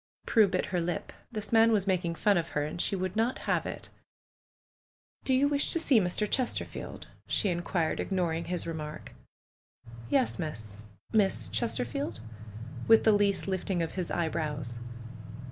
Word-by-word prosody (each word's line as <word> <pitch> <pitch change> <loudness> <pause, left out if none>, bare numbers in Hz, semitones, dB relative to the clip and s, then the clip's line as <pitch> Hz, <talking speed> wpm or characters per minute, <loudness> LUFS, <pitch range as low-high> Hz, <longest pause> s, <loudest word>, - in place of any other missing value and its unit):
Prue 220 -3 +5
bit 185 -1 0
her 175 - +2
lip. 170 -1 -3 0.2
This 215 -1 -4
man 225 0 +6
was 205 -3 +3
making 180 -3 0
fun 205 +4 +3
of 170 -2 0
her, 145 - +1
and 155 +3 -3
she - - +1
would 185 0 -2
not 230 +3 +1
have - - +1
it. - - -7 1.4
"Do - - +2
you 275 +2 +4
wish 285 0 +1
to 335 - +2
see 275 -7 +5
Mr. 190 +2 0
Chesterfield?" 255 +2 -2 0.2
she 200 -5 +1
inquired^ 170 -1 -1
ignoring 170 -3 -1
his 180 -1 -2
remark. 155 -2 -6 1.0
"Yes, 260 -7 +2
Miss 110 - -5
— - - -28
Miss 195 - +3
Chesterfield?" 115 +3 -2 0.7
with 225 0 +7
the 220 - +6
least 205 -1 +2
lift 190 0 -2
ing 175 -3 +1
of 165 - -3
his 180 -2 -3
eyebrows. 150 -7 -2
180 Hz, 160 wpm, -30 LUFS, 160-210 Hz, 1.4 s, with